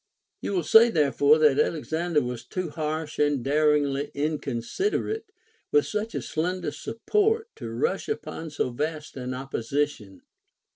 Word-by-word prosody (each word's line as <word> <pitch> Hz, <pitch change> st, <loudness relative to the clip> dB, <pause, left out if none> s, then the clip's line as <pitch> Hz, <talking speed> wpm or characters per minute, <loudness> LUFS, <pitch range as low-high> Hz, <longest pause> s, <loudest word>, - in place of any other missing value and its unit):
4. -, -, -4 dB
You -, -, -2 dB
will 175 Hz, -, +1 dB
say 225 Hz, +9 st, +7 dB
therefore 145 Hz, -, +4 dB
that 150 Hz, -3 st, +4 dB
Alexander 160 Hz, 0 st, +1 dB
Avas 125 Hz, -1 st, -5 dB
too 185 Hz, -4 st, -3 dB
rash 155 Hz, 0 st, -3 dB
and 145 Hz, -4 st, +2 dB
daringly 145 Hz, 0 st, +2 dB
mconsiderate, 155 Hz, -, -1 dB, 0.5 s
Avith 440 Hz, 0 st, +4 dB
such 215 Hz, +1 st, -3 dB
a -, -, -2 dB
slender 180 Hz, +3 st, -2 dB
support 435 Hz, -, 0 dB
to -, -, -6 dB
rush 465 Hz, -1 st, -1 dB
upon 165 Hz, -, -4 dB
so 145 Hz, -4 st, -1 dB
vast 150 Hz, +4 st, -4 dB
an 125 Hz, -1 st, -4 dB
opposition. 135 Hz, -4 st, -3 dB
155 Hz, 140 wpm, -26 LUFS, 140-185 Hz, 0.5 s, say